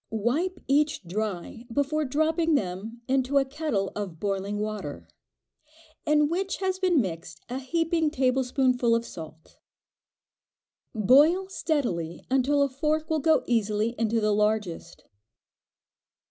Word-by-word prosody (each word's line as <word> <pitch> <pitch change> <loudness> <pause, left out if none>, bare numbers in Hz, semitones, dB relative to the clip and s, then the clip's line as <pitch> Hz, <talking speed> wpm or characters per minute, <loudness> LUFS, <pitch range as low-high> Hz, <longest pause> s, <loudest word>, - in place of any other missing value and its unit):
Wipe 280 - -1
each 295 -2 +2
dry 210 +4 -4
before 290 +4 0
dropping 315 +4 +1
them 210 +2 -3
into 265 +1 +1
a 275 - +4
kettle 265 -9 -2
of 190 -6 -5
boiling 200 +1 -2
water, 210 -8 -5 1.0
in 300 0 +4
which 380 +5 -2
has 375 -1 -1
been 365 -5 +3
mixed 165 -6 -4
a 255 +2 -3
heaping 330 +3 0
tablespoonful 255 -3 +2
of 230 0 -1
salt. 160 -4 -11 1.4
Boil 295 - +4
steadily 235 - -2
until 275 +2 +3
a - - +2
fork 305 +4 -1
will 315 - +2
go 315 +1 +3
easily 215 -2 +1
into 230 0 +1
the 210 -1 +2
largest. 210 -5 -1
255 Hz, 120 wpm, -26 LUFS, 210-305 Hz, 1.4 s, a